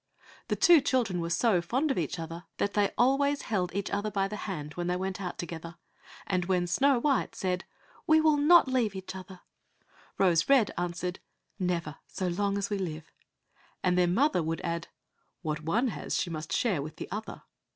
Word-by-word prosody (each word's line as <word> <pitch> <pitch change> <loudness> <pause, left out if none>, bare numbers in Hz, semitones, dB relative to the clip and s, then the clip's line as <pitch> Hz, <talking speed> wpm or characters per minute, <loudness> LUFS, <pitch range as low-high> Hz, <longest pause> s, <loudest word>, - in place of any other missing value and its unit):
The - - 0
two 345 -4 +6
children 235 -10 0
were 170 - -3
so 185 +1 +2
fond 265 - 0
of - - -1
each 165 +2 -2
another 165 +1 -7
that 200 - 0
they 205 -1 +2
always 280 +3 +2
held 185 -5 -1
each 200 0 -2
other 205 +1 -1
by 195 -1 0
the 210 - -6
hand 150 -5 -5
when 175 +1 -3
they 180 - +1
went 190 +1 -3
out 180 -2 -4
together, 170 0 -6 0.5
and 180 -2 0
when 180 -1 +1
Snow 270 +10 +3
white 275 +2 +1
said, 185 -1 -2 0.4
"We 315 0 +6
will 310 -1 +4
not 310 +2 +6
leave 245 -6 0
each 190 0 -6
other," 185 -1 -10 0.8
Rose 175 -1 +3
red 260 -7 +5
answered, 175 +1 -3 0.4
"Never 170 -5 -2
so 185 - -3
long 200 +3 0
as 200 +1 -2
we 205 - 0
live," 160 -4 -5 0.7
and 180 -1 +3
their 180 -1 +3
mother 240 - +2
would 165 +1 -2
add, 170 -1 -3 0.6
"What 155 -1 -2
one 220 +11 +1
has - - -3
she 175 - -2
must 155 0 -6
share 200 - +1
with 150 +2 -7
the - - -7
other." 215 +2 -6
190 Hz, 195 wpm, -29 LUFS, 175-230 Hz, 0.8 s, two